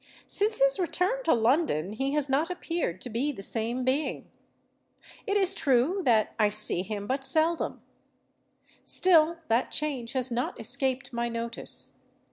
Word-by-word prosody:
Since 425 +2 +1
his - - +3
return 370 +7 0
to - - +4
London 225 - +1
he 270 +5 -2
has 295 -2 +2
not 285 +4 0
appeared 335 - -3
to - - -6
be 255 +7 -1
the 195 -8 -9
same 230 +4 -2
being. 270 +4 -2 1.0
It 405 0 +1
is 385 -1 +6
true 285 +4 +1
that 225 -4 +2
I 210 -1 +4
see 210 -4 0
him 205 +1 -5
but 270 +4 -2
seldom: 320 +3 +1 1.0
still 335 -2 +3
that 230 +3 +1
change 270 -6 -3
has 260 -1 0
not 240 +2 -3
escaped 265 -2 -2
my 235 0 -2
notice. 230 0 -2
265 Hz, 150 wpm, -27 LUFS, 230-335 Hz, 1.0 s, is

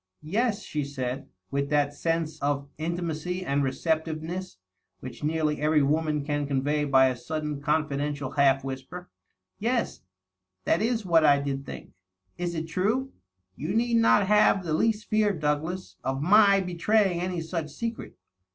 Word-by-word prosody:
" - - -55
1 155 +4 -9
es," 225 -3 +1
she 150 -1 -3
said, 135 -1 -4 0.2
with 140 0 -1
that 145 -1 +2
sense 165 0 -2
of 140 0 -1
intimacy 170 +2 -3
and 140 -1 +1
receptiveness 160 - -2 0.4
which 130 +2 -9
nearly 155 -1 0
every 150 -1 +3
woman 150 0 0
can 145 -1 -1
convey 145 +2 0
by 135 -2 +5
a 130 -1 +1
sudden 150 +3 -4
confidential 145 -2 -1
half 135 -2 +3
whisper. 135 +7 -7 0.5
"Yes 235 +3 -1 0.3
— 95 0 -53
^that 165 - +3
is 225 -1 0
what 165 -3 +4
I 145 -2 +5
did 140 -1 -4
think. - - -9 0.5
Is 175 -1 -2
it 160 0 -3
true?.. 215 +11 0 0.4
You 165 +8 -3
need 235 +1 +2
not 225 -3 +4
have 205 -1 +4
the 165 -3 -2
least 215 +5 +1
fear, 215 -2 +2
Douglas, 155 +5 -2
of 135 0 -1
my 200 +4 +5
betraying 180 +1 +1
any 180 -1 -2
such 160 -1 -4
secret. 230 +9 -6
155 Hz, 160 wpm, -27 LUFS, 140-185 Hz, 0.5 s, by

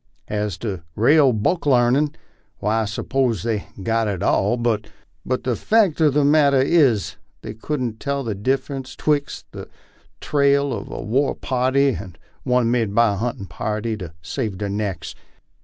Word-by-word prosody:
As 105 -4 -2
to 100 -7 -4
rale 140 +5 +5
book 135 - 0
larnin', 130 +3 +3 0.4
why 110 +2 0
I - - -1
'spose 115 0 -1
they've 110 -3 -1 0.2
got 115 +1 +1
it 100 -4 -2
all; 120 - +2
but 115 -3 -1 0.4
the 130 -1 -1
fact 200 - +2
ur 155 - +6
the 145 0 +2
matter 145 -2 +4
is, 130 - +2 0.3
they 110 - -6
couldn't 120 -1 -3
tell 140 -1 -2
the 115 -3 -2
difference 130 +5 -2
twixt 145 -2 -1
the - - -9 0.5
trail 140 -1 +2
of - - -6
a - - -6
war 130 +6 +1
party 130 +2 +1
and 95 -9 -6 0.2
one 125 -2 +1
made 115 -4 0
by 115 -2 +4
a - - -4
huntin' 115 -2 -3
party 110 +3 -3
to 90 -5 -7
save 110 -2 -3
their 100 0 -3
necks. 100 -5 -3
120 Hz, 160 wpm, -21 LUFS, 105-140 Hz, 0.5 s, ur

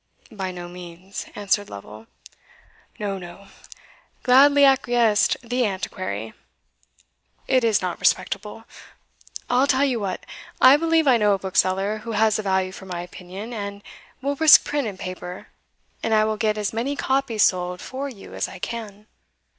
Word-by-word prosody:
"By 190 -3 -4
no 175 -1 -7
means," 180 +2 -9
answered 205 0 0
Lovel. 105 +2 -11 0.9
"No, 200 -2 -3
no!" 180 +2 -12 0.7
gladly 280 +3 +6
acquiesced 240 -5 +3
the 245 +1 -1
Antiquary 185 - -5 1.1
"it 255 -2 +3
is 220 -4 +2
not 180 -1 -3
respectable. 205 +4 -1 0.8
I'll 255 +3 +3
tell 275 0 +3
you 255 -4 0
what: 195 -3 -4 0.3
I 260 +2 +8
believe 325 0 +2
I 255 -3 +6
know 210 -2 +3
a - - -3
bookseller 190 +2 0
who 230 +1 -6
has 215 0 +2
a - - 0
value 190 -2 0
for 190 0 -11
my 175 -2 -4
opinion, 185 +6 -9
and 200 -2 -6 0.4
will 280 +1 -1
risk 320 0 +8
print 290 -4 -1
and 200 -3 -6
paper, 180 0 -7 0.5
and 220 - +1
I 215 0 +4
will 215 0 -1
get 215 -1 0
as 210 0 -2
many 250 +6 -2
copies 265 -6 +1
sold 180 -1 +1
for 275 +2 -5
you 210 -7 -12
as - - -2
I 190 - -10
can." 210 0 -7
210 Hz, 155 wpm, -23 LUFS, 185-245 Hz, 1.1 s, I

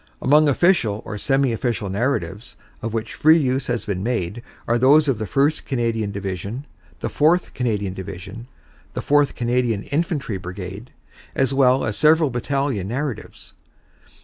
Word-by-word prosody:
Among 150 +1 +4
official 135 - +2
or 105 -1 -6
semi 135 -1 +1
official 115 -3 -2
narratives 105 -1 -2 0.2
of 115 - -3
which 115 0 -3
free 160 +2 +5
use 130 -3 0
has 120 -3 -2
been 95 -3 -2
made 115 -1 -2 0.3
are 120 +1 +2
those 145 +4 +5
of 135 -6 +1
the 110 - -2
1st 145 +3 +1
Canadian 115 -5 -1
Division, 100 - -5 0.4
the - - -1
4th 165 +4 +2
Canadian 105 -6 -1
Division, 95 +5 -8 0.5
the - - -2
4th 145 0 +2
Canadian 120 -3 0
Infantry 145 - -2
Brigade, 95 +5 -8 0.5
as 135 0 +1
well 135 -1 +3
as 110 - -2
several 155 -1 +4
battalion 125 -4 -1
narratives. 130 +2 -5
120 Hz, 145 wpm, -22 LUFS, 105-140 Hz, 0.5 s, free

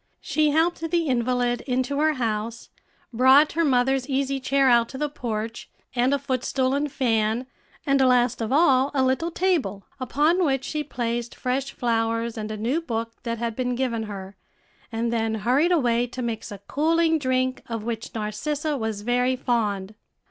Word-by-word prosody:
She 305 0 +1
helped 325 +3 +1
the 340 -1 +1
invalid 245 -2 0
into 260 +2 0
her 310 +1 +3
house, 230 -2 -3 0.4
brought 265 +5 +6
her 335 +2 +1
mother's 265 -1 +2
easy 275 0 0
chair 275 +1 +2
out 235 -2 +4
to 265 - -7
the 300 +2 0
porch, 225 -5 -5 0.3
and 250 +2 +2
a 280 - +3
footstool 260 -1 -1
and 285 +1 -1
fan, 225 -1 +1 0.4
and 275 -2 +3
last 250 -1 +3
of 225 - -2
all 275 -3 +4
a 265 - +3
little 260 +6 +1
table, 330 - 0
upon 300 +8 +2
which 270 -4 +1
she 300 +2 -3
placed 240 -3 -3
fresh 260 +2 -2
flowers 230 -1 -1
and 215 -1 -5
a 215 - -4
new 245 +10 0
book 230 -6 -3
that 230 -1 -3
had 230 -1 -3
been 250 0 -1
given 240 -3 -1
her, 195 -1 -7 0.6
and 230 +1 -1
then 225 -1 0
hurried 255 - +2
away 245 -7 +2
to 250 +1 -6
mix 230 -1 -4
a 205 - -6
cooling 325 +2 +2
drink, 255 -1 0
of 225 -2 -3
which 230 0 -5
Narcissa 285 +8 -2
was 220 -5 -3
very 250 +2 +1
fond. 215 -6 -1
250 Hz, 170 wpm, -24 LUFS, 230-280 Hz, 0.6 s, brought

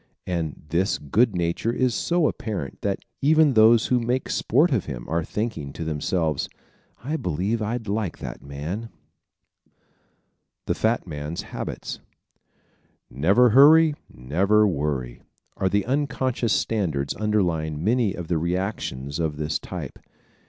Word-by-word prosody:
And 85 -4 -3
this 90 +5 +1
good 105 - +2
nature 85 +6 0
is 125 0 +1
so 170 +5 +1
apparent 100 -11 -4
that - - -2 0.2
even 155 0 +5
those 110 0 +6
who 125 - +2
make 120 +2 -1
sport 150 +8 +2
of 115 -8 +1
him 60 -5 -6
are 85 +1 0
thinking 105 -7 -3
to 80 - -5
themselves: 80 0 -1 0.5
"I 150 +5 -2
believe 95 - -1
I'd 110 +1 -3
like 100 -2 -2
that - - -7
man." 80 +11 -5 1.8
The - - +1
Fat 115 +2 0
Man's 75 -1 -5
Habits - - -6 1.1
¶ - - -15
"Never 100 - +4
hurry 155 +5 +7 0.2
and 65 - -15
never 100 +8 +4
worry" 70 -8 -2 0.3
are 95 - 0
the 100 0 +1
unconscious 130 -4 0
standards 80 -11 0
underlying 85 -8 0
many 110 -1 +2
of 90 -2 -6
the 85 -2 0
reactions 85 -6 -3
of 80 -3 -1
this 75 +1 -1
type. - - -7
95 Hz, 140 wpm, -24 LUFS, 80-115 Hz, 1.8 s, hurry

